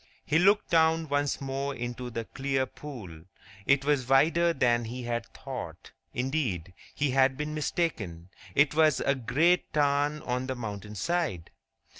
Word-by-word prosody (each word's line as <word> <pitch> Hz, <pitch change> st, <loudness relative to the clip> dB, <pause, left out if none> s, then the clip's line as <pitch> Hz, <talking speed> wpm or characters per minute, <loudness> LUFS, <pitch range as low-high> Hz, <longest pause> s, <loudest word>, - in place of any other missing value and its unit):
He 155 Hz, +1 st, +3 dB
looked 200 Hz, +4 st, +3 dB
down 160 Hz, -1 st, +3 dB
once 145 Hz, -1 st, 0 dB
more 135 Hz, 0 st, -3 dB
into 120 Hz, 0 st, -5 dB
the 115 Hz, -1 st, -4 dB
clear 135 Hz, +1 st, -1 dB
pool. 100 Hz, -, -10 dB, 0.4 s
It 140 Hz, 0 st, +3 dB
was 140 Hz, -4 st, +1 dB
wider 165 Hz, +5 st, +4 dB
than 120 Hz, -6 st, +2 dB
he 125 Hz, +2 st, -6 dB
had 120 Hz, -1 st, -3 dB
thought—indeed, 125 Hz, -, -5 dB, 0.2 s
he 145 Hz, -2 st, +1 dB
had 130 Hz, 0 st, +3 dB
been 150 Hz, 0 st, -3 dB
mistaken; 110 Hz, -, -2 dB, 0.3 s
it 145 Hz, 0 st, +4 dB
was 155 Hz, -3 st, +4 dB
a 140 Hz, -, +2 dB
great 150 Hz, +8 st, +2 dB
tarn 145 Hz, +1 st, +1 dB
on 125 Hz, +1 st, -2 dB
the 130 Hz, -, -2 dB
mountain 105 Hz, -3 st, -6 dB
side! 130 Hz, -, -2 dB
135 Hz, 145 wpm, -28 LUFS, 120-150 Hz, 0.4 s, wider